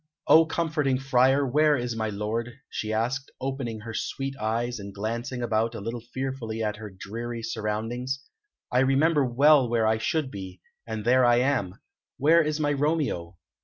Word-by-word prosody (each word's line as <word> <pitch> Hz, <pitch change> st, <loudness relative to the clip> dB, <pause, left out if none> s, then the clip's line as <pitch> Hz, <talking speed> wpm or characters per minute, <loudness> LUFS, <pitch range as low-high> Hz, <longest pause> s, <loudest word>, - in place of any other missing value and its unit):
"O 160 Hz, 0 st, +7 dB
comforting 155 Hz, -5 st, 0 dB
Friar, 135 Hz, +1 st, +3 dB
where 150 Hz, +3 st, +3 dB
is 120 Hz, -1 st, -3 dB
my 110 Hz, -1 st, -1 dB
lord?" 110 Hz, +4 st, -3 dB, 0.2 s
she 110 Hz, -, -3 dB
asked, 125 Hz, +5 st, -1 dB
opening 130 Hz, -4 st, -4 dB
her 115 Hz, +1 st, -7 dB
sweet 135 Hz, +4 st, -3 dB
eyes, 115 Hz, +2 st, -1 dB
and 100 Hz, -1 st, -8 dB
glancing 120 Hz, +4 st, -3 dB
about 115 Hz, 0 st, 0 dB
a -, -, -5 dB
little 115 Hz, +3 st, -5 dB
fearfully 120 Hz, -2 st, -4 dB
at 105 Hz, -1 st, -2 dB
her 110 Hz, -1 st, -8 dB
dreary 115 Hz, +5 st, -6 dB
surroundings. 115 Hz, +4 st, -3 dB, 0.5 s
"I 125 Hz, -, +3 dB
remember 140 Hz, +3 st, +3 dB
well 135 Hz, +1 st, +5 dB
where 115 Hz, -1 st, +2 dB
I 110 Hz, 0 st, +2 dB
should 145 Hz, +3 st, -1 dB
be, 95 Hz, -2 st, -8 dB, 0.3 s
and 110 Hz, -1 st, -4 dB
there 130 Hz, +2 st, +5 dB
I 120 Hz, -1 st, +5 dB
am. 120 Hz, -7 st, +1 dB, 0.4 s
Where 160 Hz, +4 st, +5 dB
is 155 Hz, -1 st, -1 dB
my 145 Hz, -1 st, +1 dB
Romeo?" 140 Hz, -, -1 dB
120 Hz, 165 wpm, -26 LUFS, 110-135 Hz, 0.5 s, O